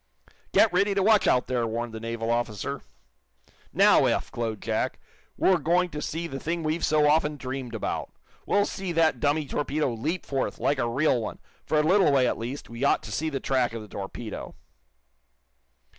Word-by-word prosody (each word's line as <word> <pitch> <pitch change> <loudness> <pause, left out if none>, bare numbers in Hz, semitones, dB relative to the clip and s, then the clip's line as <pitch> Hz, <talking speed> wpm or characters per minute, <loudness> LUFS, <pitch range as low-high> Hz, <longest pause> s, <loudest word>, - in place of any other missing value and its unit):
"Get 220 - +4
ready 200 +2 +2
to 195 - +2
watch, 215 0 +4
out 125 - +3
there!" 120 -2 -1
warned 115 +1 -3
the 110 - -5
naval 115 0 -3
officer. 120 -4 -2 0.9
"Now, - - +5
Eph," - - 0
glowed 115 -3 -3
Jack, - - -2 0.4
"we're 185 -2 +3
going 175 +4 +2
to 150 - -5
see 165 +3 -3
the 135 -5 -5
thing 165 +2 -3
we've 155 +2 -1
so 150 -1 +3
often 150 0 +2
dreamed 130 -2 -5
about! - - -3 0.4
We'll 205 0 +3
see 190 -2 -4
that 165 -1 +2
dummy 150 +1 +1
torpedo 145 -1 -1
leap 155 +11 -3
forth, 135 -2 -2
like 140 -1 0
a 120 - 0
real 130 0 +2
one. - - -5 0.3
For 155 - +1
a 150 - +4
little 185 0 +4
way, 135 -2 +4
at - - -1
least, 125 +5 -5
we 115 +3 -6
ought 140 - +3
to - - -8
see 160 +1 -1
the 140 -3 -3
track 130 -3 0
of 115 -2 -5
the - - -11
torpedo." 100 +3 -7
140 Hz, 190 wpm, -26 LUFS, 120-160 Hz, 0.9 s, Now